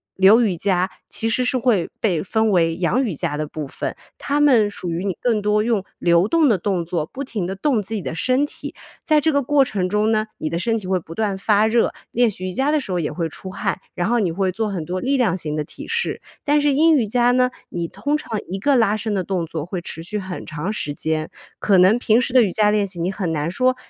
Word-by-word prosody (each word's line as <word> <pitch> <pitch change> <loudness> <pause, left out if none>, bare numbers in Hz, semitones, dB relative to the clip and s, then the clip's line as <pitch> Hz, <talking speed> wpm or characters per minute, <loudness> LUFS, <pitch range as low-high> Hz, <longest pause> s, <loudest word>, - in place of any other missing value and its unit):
流 195 +5 +6
瑜 205 -7 +1
伽 185 +1 0 0.2
其 225 - -2
实 250 +2 +1
是 255 +1 +1
会 230 -9 +1
被 180 -8 +1
分 220 +2 +1
为 165 -3 +2
阳 190 +9 +1
瑜 210 -10 -2
伽 145 - -2
的 150 0 -3
部 155 0 -5
分。 - - -5 0.2
它 285 +1 -1
们 250 -8 +5
属 180 -4 -5
于 170 +2 -2
你 190 - -1
更 230 -4 +1
多 210 +1 +2
用 220 -4 0
流 170 +2 +3
动 325 +3 +3
的 220 -6 +3
动 180 -2 -1
作， 165 -2 -2
不 275 +9 -6
停 215 -8 -4
地 190 - -4
动 240 0 +1
自 215 +3 -7
己 210 - -2
的 160 - -4
身 255 - +1
体。 - - -9 0.3
在 310 -1 +3
这 315 +2 +2
个 285 - +3
过 280 +1 +3
程 190 -6 -2
中 210 +3 +1
呢， 215 0 +1
你 155 - -3
的 170 - -1
身 225 +4 0
体 210 - -7
会 185 -1 +1
不 165 - -11
断 210 -3 0
发 210 +1 +3
热， 230 +1 +2 0.2
练 240 -1 +3
习 185 -2 -6
瑜 185 - -3
伽 270 +6 +1
的 305 - +2
时 230 - -6
候 180 - 0
也 150 - -2
会 165 +2 -2
出 185 +4 -8
汗， 195 0 -2 0.2
然 175 - -1
后 240 +2 +2
你 185 -6 +1
会 190 +2 0
做 215 +3 -2
很 180 -6 -4
多 180 +3 -3
力 275 +1 +1
量 220 -8 +2
型 155 -4 -4
的 150 - -1
体 285 - -10
式。 465 +1 -2 0.2
但 295 0 +3
是 290 -1 +2
阴 320 +3 +5
瑜 240 -7 +1
伽 240 +3 +3
呢， 250 0 +3 0.2
你 170 -1 -3
通 290 - -2
常 225 -7 -4
一 190 - -3
个 280 +7 +3
拉 225 -4 +3
伸 215 0 -3
的 185 - 0
动 180 -2 -2
作 160 -2 -4
会 175 0 -4
持 165 - -7
续 210 +5 -4
很 185 -2 -6
长 155 +5 -4
时 150 -9 -3
间， 155 +1 -2 0.3
可 200 -2 +3
能 190 +5 +6
平 230 0 +3
时 250 - -3
的 255 -3 +7
瑜 195 - 0
伽 210 +3 +3
练 210 -1 +2
习， 180 -2 -7
你 180 +3 0
很 185 -4 -3
难 155 +1 -1
说 255 +6 +2
205 Hz, 285 characters per minute, -21 LUFS, 180-245 Hz, 0.3 s, 的